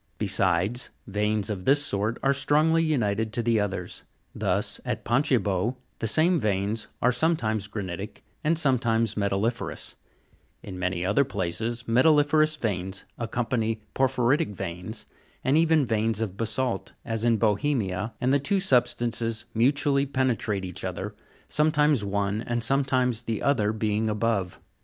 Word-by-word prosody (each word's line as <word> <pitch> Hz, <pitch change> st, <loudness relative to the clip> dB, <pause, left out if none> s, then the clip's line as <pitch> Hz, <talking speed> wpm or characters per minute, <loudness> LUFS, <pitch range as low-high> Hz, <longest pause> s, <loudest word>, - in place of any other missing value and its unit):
Besides, 95 Hz, +8 st, +2 dB, 0.2 s
veins 105 Hz, +1 st, -1 dB
of 95 Hz, -3 st, -5 dB
this 145 Hz, +2 st, +4 dB
sort 105 Hz, 0 st, -1 dB
are 140 Hz, -, +4 dB
strongly 155 Hz, +4 st, +2 dB
united 110 Hz, -8 st, 0 dB
to 120 Hz, -, 0 dB
the 115 Hz, -1 st, +2 dB
others: 100 Hz, -3 st, -3 dB, 0.3 s
thus, -, -, -1 dB
at -, -, -4 dB
Pontgibaud, 120 Hz, -, +1 dB, 0.2 s
the 115 Hz, -, -1 dB
same 165 Hz, -, +3 dB
veins 105 Hz, 0 st, -1 dB, 0.2 s
are 125 Hz, -, +5 dB
sometimes 115 Hz, -7 st, 0 dB
granitic 100 Hz, 0 st, -6 dB, 0.2 s
and 160 Hz, +2 st, +2 dB
sometimes 115 Hz, -, +1 dB
metalli'ferous; 105 Hz, +3 st, -2 dB, 0.7 s
in 95 Hz, -2 st, -7 dB
many 90 Hz, -1 st, -1 dB
other 105 Hz, +9 st, +3 dB
places 115 Hz, +1 st, -3 dB
metalli'ferous 150 Hz, +5 st, +4 dB
veins 95 Hz, -6 st, -3 dB
accompany 115 Hz, -1 st, -1 dB
por 135 Hz, -, +3 dB
phyritic 130 Hz, 0 st, +1 dB
veins, 90 Hz, +6 st, -6 dB, 0.4 s
and 135 Hz, -, +2 dB
even 160 Hz, -2 st, +4 dB
veins 110 Hz, -1 st, 0 dB
of 105 Hz, -5 st, -3 dB
basa'lt, 115 Hz, +3 st, -2 dB
as 115 Hz, -1 st, -2 dB
in 120 Hz, -1 st, +3 dB
Bohemia, 105 Hz, -2 st, 0 dB
and 130 Hz, +2 st, +1 dB
the 140 Hz, -, +4 dB
two 195 Hz, +8 st, 0 dB
sub 125 Hz, -10 st, +4 dB
stances 115 Hz, -2 st, -2 dB
mutually 140 Hz, +4 st, +2 dB
penetrate 125 Hz, -7 st, -1 dB
each 90 Hz, -1 st, -7 dB
other, -, -, -4 dB, 0.3 s
sometimes 150 Hz, -4 st, +2 dB
one 100 Hz, +1 st, -1 dB
and 120 Hz, 0 st, -2 dB
sometimes 130 Hz, -2 st, +1 dB
the 115 Hz, -3 st, -3 dB
other 110 Hz, -7 st, +2 dB
being 110 Hz, 0 st, 0 dB
above. 105 Hz, -4 st, -1 dB
115 Hz, 140 wpm, -26 LUFS, 105-135 Hz, 0.7 s, are